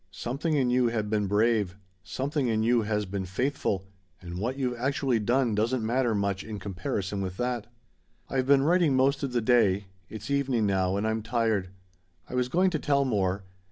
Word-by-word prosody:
Something 150 +6 -2
in 130 -4 +2
you 125 -1 +3
had 110 -3 -2
been 105 -2 +1
brave; 105 -2 +2 0.3
something 140 - -2
in 110 -1 +1
you 120 +1 +3
has 105 -1 -1
been 95 0 -4
faithful 95 -1 -1 0.3
and 90 -1 -7
what 125 +6 -2
you've 125 -3 -1
actually 130 -2 +1
done 120 +2 +1
doesn't 110 +3 0
matter 120 0 +1
much 100 -1 -1
in 110 -1 -6
comparison 100 +1 -3
with 95 -1 -4
that. 120 -3 -2 0.6
"I've 130 -1 -1
been 140 -1 +5
writing 165 -2 +3
most 135 +2 +2
of 140 -3 -2
the 120 -1 +1
day. 105 -4 +3 0.2
It's 110 +5 -7
evening 135 -5 +1
now, 95 -1 +1
and 100 - -1
I'm 110 0 -1
tired. 110 -4 0 0.6
I - - -10
was 125 0 0
going 185 +6 +3
to 155 - -1
tell 140 -2 +2
more. 95 -5 0
115 Hz, 190 wpm, -28 LUFS, 100-130 Hz, 0.6 s, been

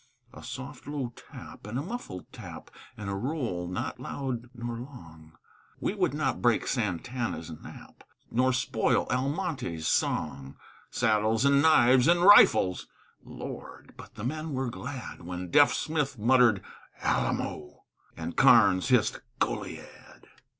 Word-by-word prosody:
A - - -11
soft 130 +3 -8
low 140 -5 -4
tap, - - -12
and 115 +4 -4
a 140 - -2
muffled 185 - -7
tap, - - -10 0.3
And 105 -2 -6
a 100 - -2
roll 110 - -3
not 90 - -4
loud 125 -4 -5
nor 120 -1 -5
long 80 - -12 0.4
We - - -1
would - - 0
not - - -1
break - - +2
Sant' 105 +1 -2
Anna's 115 -10 -3
nap, 80 - -12 0.3
Nor 130 +2 +2
spoil 125 - +1
Almonte's 135 - -2
song. 70 0 -1 0.3
Saddles 110 +3 +1
and 140 0 +5
knives 130 -4 +5
and 175 +1 +4
rifles! 180 - +6 0.4
Lord! - - -9
but - - -13
the 105 - -8
men 155 +4 -3
were 130 -2 -2
glad 125 0 -7
When 90 0 -6
Deaf 145 +8 +6
Smith 150 -4 -2
muttered 120 -2 +4 0.4
"Alamo!" 75 -1 -2 0.3
And 85 +1 -5
Karnes 95 +5 +5
hissed 125 -4 +2 0.2
"Goliad!" - - -5
120 Hz, 135 wpm, -28 LUFS, 95-140 Hz, 0.4 s, rifles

